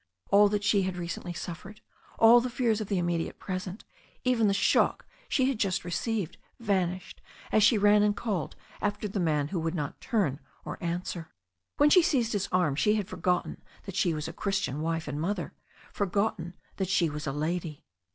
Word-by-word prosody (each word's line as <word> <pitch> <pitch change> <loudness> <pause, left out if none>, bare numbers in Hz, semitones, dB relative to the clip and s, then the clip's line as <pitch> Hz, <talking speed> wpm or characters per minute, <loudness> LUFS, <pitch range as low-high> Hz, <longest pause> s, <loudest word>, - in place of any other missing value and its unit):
All 205 +1 +6
that 205 0 -1
she 200 -1 +3
had 185 -1 -2
recently 175 +1 -5
suffered, 185 +5 -7 0.4
all 235 +2 +7
the 250 - -2
fears 235 -3 0
of 215 - -4
the 200 - 0
immediate 175 -1 -1
present, 185 +1 -5 0.4
even 245 -4 +3
the - - +3
shock 195 - +2 0.2
she 260 - +2
had 265 -5 -1
just 190 -5 0
received, 185 0 -2 0.2
vanished 185 -4 -1 0.3
as 215 - +4
she 210 +2 +5
ran 205 0 +5
and 205 0 +2
called 195 -10 -2 0.3
after 205 +1 -1
the 200 0 -3
man 150 -4 +1
who 180 - -2
would 165 +1 -2
not 150 -3 -4
turn 185 - 0 0.3
or - - -7
answer. 170 -1 -3 0.5
When 295 +1 +5
she 365 - +8
seized 265 -10 +1
his 200 -1 -1
arm 180 -6 +2
she 210 +8 +3
had 205 -3 -2
forgotten 180 0 -1 0.2
that 195 - -8
she 180 -4 +1
was 155 +1 -4
a 160 - -6
Christian 190 -8 -2
wife 165 0 -2
and 145 +1 -3
mother, 180 +1 -2 0.4
forgotten 200 -3 -1 0.2
that 190 -2 -2
she 180 -3 +3
was 150 0 -5
a - - 0
lady. 155 +1 -3
190 Hz, 190 wpm, -28 LUFS, 170-210 Hz, 0.5 s, she